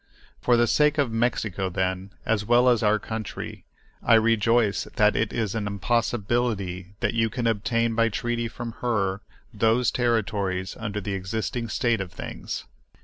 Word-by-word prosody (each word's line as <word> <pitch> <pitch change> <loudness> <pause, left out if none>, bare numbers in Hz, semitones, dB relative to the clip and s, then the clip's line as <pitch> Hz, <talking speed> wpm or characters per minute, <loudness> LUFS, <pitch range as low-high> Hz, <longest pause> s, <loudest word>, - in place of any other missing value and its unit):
For 120 -1 +4
the 120 - +4
sake 150 +5 +3
of 140 -5 +1
Mexico, 110 -5 0
then, 95 +1 -2 0.2
as 110 -2 +1
well 120 +3 +4
as 120 -3 +3
our 105 -1 +4
own - - -1
country, 110 -2 -6 0.4
I 115 - +5
rejoice 115 -1 +3
that 105 0 +4
it 110 - 0
is 110 -4 -1
an 110 -2 -2
impossibility 100 -3 -1
that - - +1
you 115 -1 +2
can 120 +2 -3
obtain 115 +1 +1
by 115 0 +3
treaty 120 +2 -2
from 115 0 -6
her 100 -5 0 0.3
those 115 +2 +2
territories 100 -6 0
under 105 -2 -3
the 100 0 -3
existing 110 +5 -3
state 120 -3 +1
of 90 -3 -5
things. - - -6
110 Hz, 160 wpm, -25 LUFS, 100-120 Hz, 0.4 s, I